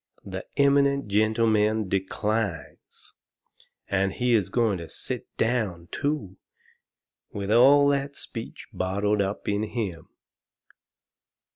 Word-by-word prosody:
The 95 -1 -6
eminent 140 -3 +3
gentleman 110 0 +2
declines! 95 -2 -3 0.7
And 95 0 0
he 125 -1 +1
is 100 -5 +2
going 110 -3 +1
to 85 - -8
sit - - -5
down, 105 -8 -1
too, 140 -11 -3 0.9
with 100 0 -4
all 140 +5 +6
that 140 0 -1
speech - - -6
bottled 100 +3 0
up 100 +1 -3
in 100 0 0
him! 105 -7 -4
105 Hz, 105 wpm, -26 LUFS, 95-120 Hz, 0.9 s, all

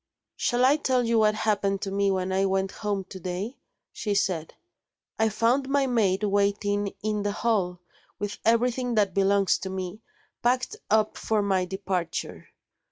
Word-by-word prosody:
"Shall 245 +1 +2
I 280 +3 +5
tell 260 -4 +1
you 230 -1 +2
what 215 -1 +4
happened 200 -3 0
to 195 - -3
me 200 0 +1
when 190 -1 -1
I 190 +1 +2
went 190 0 0
home 205 -2 -2
to 190 0 -10
day?" 185 +8 -4 0.4
she 205 -2 -2
said. 175 -5 -1 0.6
"I 220 0 +3
found 245 +6 +1
my 280 0 +2
maid 215 -6 +1
waiting 205 0 +1
in 210 -1 0
the 205 0 -1
hall 200 -6 0 0.4
with 205 +1 -4
everything 245 +2 +2
that 200 -4 +2
belongs 195 0 +3
to 190 - -5
me, 190 +2 -5 0.4
packed 250 +2 +1
up 215 0 +2
for 215 -2 0
my 190 -2 +1
departure. 185 -3 -4
205 Hz, 165 wpm, -26 LUFS, 190-225 Hz, 0.6 s, I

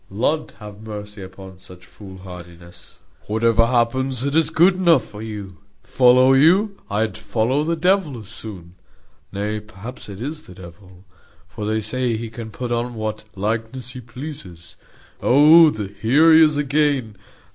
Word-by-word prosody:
Lud 130 +10 -1
have 105 -2 -11
mercy 105 -1 -8
upon 95 0 -12
such 90 -1 -15
fool 95 +2 -13
hardiness! 85 -2 -12 0.3
Whatever 115 +1 +2
happens, 125 +1 0
it 140 0 -2
is 160 0 +3
good 175 +4 +4
enough 170 -8 +3
for 105 -1 -9
you. 105 -4 -8 0.3
Follow 130 +1 +4
you? 185 +9 +4
I'd 110 +2 -1
follow 110 +7 -1
the 165 +2 -1
devil 180 -4 +1
as 110 -4 -11
soon. 90 -7 -10 0.6
Nay, 105 +2 -3
perhaps 105 +3 -11
it 100 -1 -9
is 150 +6 -5
the 90 - -15
devil 90 +1 -14 0.4
for 105 - -6
they 110 0 0
say 125 +1 -1
he 115 0 -7
can 115 -1 -8
put 120 +2 -6
on 120 0 -2
what 110 -1 -5
likeness 115 +5 -3
he 125 -1 -9
pleases. 120 - -10 0.5
Oh! 155 +4 +6
here 110 +10 +2
he 160 - +7
is 150 -2 +2
again. 140 -6 0
110 Hz, 155 wpm, -21 LUFS, 100-135 Hz, 0.6 s, he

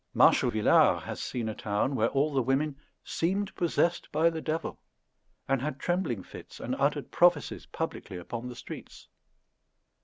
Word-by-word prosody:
Marshal - - +5
Villars 110 -1 +4
has - - -5
seen 120 -3 -3
a 110 - -2
town 105 +6 -1
where 115 -3 +2
all 145 +2 +1
the 135 - +3
women 135 +4 +1 0.3
"seemed 195 +4 -1
possessed 175 0 0
by 160 +2 +3
the 160 -1 -4
devil," 160 +1 -3 0.7
and 135 -1 +1
had 140 -1 -3
trembling 175 - -1
fits, - - -11
and - - -2
uttered - - 0
prophecies - - +3
publicly 90 - -5
upon 115 +7 -6
the 125 - -7
streets. 115 - -10
135 Hz, 155 wpm, -29 LUFS, 120-165 Hz, 0.7 s, Marshal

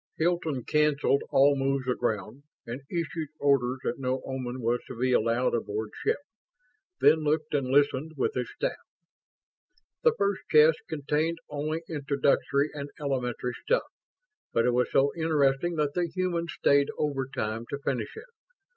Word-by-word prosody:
Hilton 160 -6 0
canceled 150 -1 +2
all 140 +1 +5
moves 135 -1 0
aground 120 0 -2 0.2
and 120 +3 -6
issued 165 -2 -3
orders 135 -3 +2
that 120 - -2
no 130 0 -1
Oman 130 -1 -4
was 120 +1 +1
to 125 - -8
be 130 0 +2
allowed 115 +2 +2
aboard 110 -2 -2
ship, - - +2 0.8
then 160 - +6
looked 155 0 0
and 140 -3 +1
listened 145 +3 +2
with 130 - 0
his 125 -1 -2
staff. - - -1 1.3
The 475 - +4
first 200 -1 0
chest 155 +1 +6
contained 155 +2 -1
only 155 +3 -2
introductory 140 -1 +1
and 145 -1 -6
elementary 125 -3 -2
stuff; - - +1 0.7
but 115 - +2
it 125 - +3
was 125 +1 +1
so 140 +1 +3
interesting 160 0 +1
that 150 -2 0
the 175 -1 0
humans 170 -1 -2
stayed 140 0 +4
overtime 130 -6 -2
to 140 - -3
finish 140 - -3
it. 440 - -8
140 Hz, 145 wpm, -28 LUFS, 125-155 Hz, 1.3 s, then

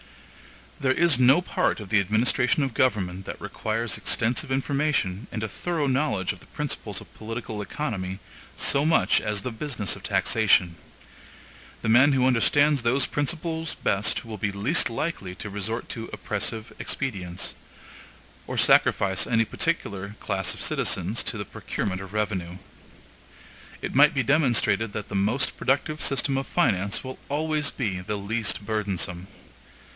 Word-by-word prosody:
There 130 -2 +2
is 165 -4 +3
no 135 +8 +5
part - - 0
of 105 -3 -8
the 105 - +4
administration 120 - +2
of 135 -3 -2
government 95 -7 0
that - - -6
requires 115 +1 -3
extensive 120 +3 0
information 135 -7 0
and 110 - -4
a - - -1
thorough 165 +6 -2
knowledge 130 -8 0
of - - -14
the - - -18
principles - - -3
of - - -15
political 110 -1 -5
economy, 100 -6 -4 0.4
so 140 - +3
much 160 +1 +3
as 105 -2 -2
the 125 - -4
business 115 - -1
of - - -11
taxation. 95 -6 +2 1.1
The 110 - 0
man 130 +5 +6
who 130 -1 +3
understands 140 +4 +4
those 125 +4 +2
principles 160 +2 -2
best 100 +3 0
will 110 -2 -7
be 105 0 0
least 110 +12 +2
likely 115 - -3
to 105 - -6
resort 105 +4 -3
to 115 -1 -5
oppressive 110 +1 -3
expedients, 95 -8 -3 0.9
or - - -4
sacrifice 95 -2 +4
any 115 -1 +2
particular 105 - -2
class 95 -2 -1
of - - -9
citizens 95 +6 0
to 115 - -1
the 100 - -4
procurement 95 0 -4
of 95 -1 -9
revenue. 95 -5 -2 1.3
It - - -3
might 145 +3 +6
be 135 - +2
demonstrated 115 -7 +2
that 105 - -5
the 100 - -5
most 110 +7 +1
productive 150 +3 0
system 135 0 +2
of 135 - -5
finance 100 - +1
will 130 0 -7
always 150 0 0
be 100 -8 -2
the 105 +3 -4
least 105 +1 -2
burdensome. 95 -4 -2
115 Hz, 150 wpm, -25 LUFS, 100-135 Hz, 1.3 s, man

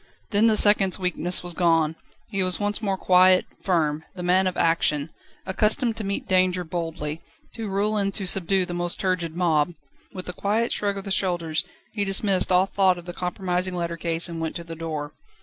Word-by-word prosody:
Then 210 +2 +4
the 220 -1 +3
second's 200 -3 +4
weakness 180 -1 -1
was 175 -1 -4
gone; 165 -3 +2 0.4
he 195 -2 0
was 185 -1 +2
once 205 +1 -1
more 195 -3 -1
quiet, 185 0 +5 0.2
firm, 160 -4 0
the 180 - -6
man 185 +2 +3
of 185 - -3
action, 160 -2 +1 0.3
accustomed 220 +5 +1
to 220 - -3
meet 200 0 -3
danger 185 -1 +2
boldly, 165 -2 -4 0.3
to 225 -3 -5
rule 205 +2 0
and 200 -1 0
to 195 - -1
subdue 190 0 +3
the 175 - -6
most 175 0 -2
turgid 175 -4 -1
mob. 170 -2 +1 0.4
With 185 -1 -8
a 180 - -4
quiet 215 +6 0
shrug 200 -1 -1
of 195 - -4
the 195 - -6
shoulders, 175 -4 0 0.3
he 205 -2 0
dismissed 195 -1 +2
all 180 +1 +5
thought 190 -2 +2
of 175 - -10
the 175 - -7
compromising 180 0 -2
lettercase, 170 -1 -1
and 165 -1 -6
went 160 -1 -3
to 170 - -5
the 165 0 -8
door. 155 -2 -5
180 Hz, 195 wpm, -24 LUFS, 170-195 Hz, 0.4 s, quiet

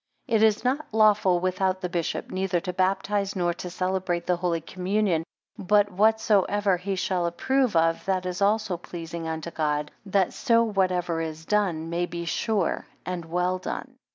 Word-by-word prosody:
5 230 - +1
It 215 - +4
is 220 -1 +4
not 270 +4 0
lawful 210 -4 +4
without 185 +1 0
the 180 - -1
bishop; 175 -2 -3
neither 185 -1 0
to 180 0 -4
baptize, 195 +2 0
nor 175 -2 +1
to 180 +1 -7
celebrate 185 -1 -1
the 180 - +2
Holy 170 -1 0
Communion 185 0 0 0.4
but 205 +1 +3
whatsoever 205 -1 +3
he 190 +2 -3
shall 185 -2 0
approve 255 +6 +1
of, 165 0 +2
that 190 -1 0
is 180 +1 -4
also 205 -2 +2
pleasing 165 -1 -7
unto 160 +1 -4
God; 150 -2 -1 0.2
that 195 -1 +2
so 230 -3 +3
whatever 180 -5 0
is 160 0 -5
done, 175 -6 0
may 175 +1 0
be 170 0 -5
sure 200 +2 -1 0.2
and 180 -2 -4
well 180 +2 0
done. - - -5
185 Hz, 170 wpm, -26 LUFS, 170-205 Hz, 0.4 s, It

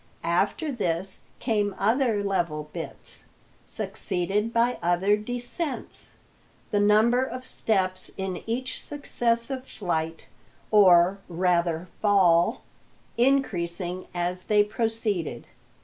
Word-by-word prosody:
After 200 - 0
this 190 -5 -2 0.2
came 210 -5 0
other 225 0 +2
level 170 -6 -1
bits, 165 -2 -4 0.4
succeeded 195 +4 -1
by 235 +1 +2
other 175 +4 +3
descents, 245 +7 -4 0.6
the 205 - +2
number 215 +5 +4
of 255 0 -5
steps 185 -6 0
in 190 -2 -3
each 255 +3 -3
successive 255 -2 -1
flight 165 -4 -3 0.4
or, 190 -2 +6
rather, 170 -1 +1
fall 185 -5 +4 0.5
increasing 185 -9 0
as 180 +1 -2
they 210 -1 +4
proceeded. 210 - -2
200 Hz, 95 wpm, -26 LUFS, 175-230 Hz, 0.6 s, or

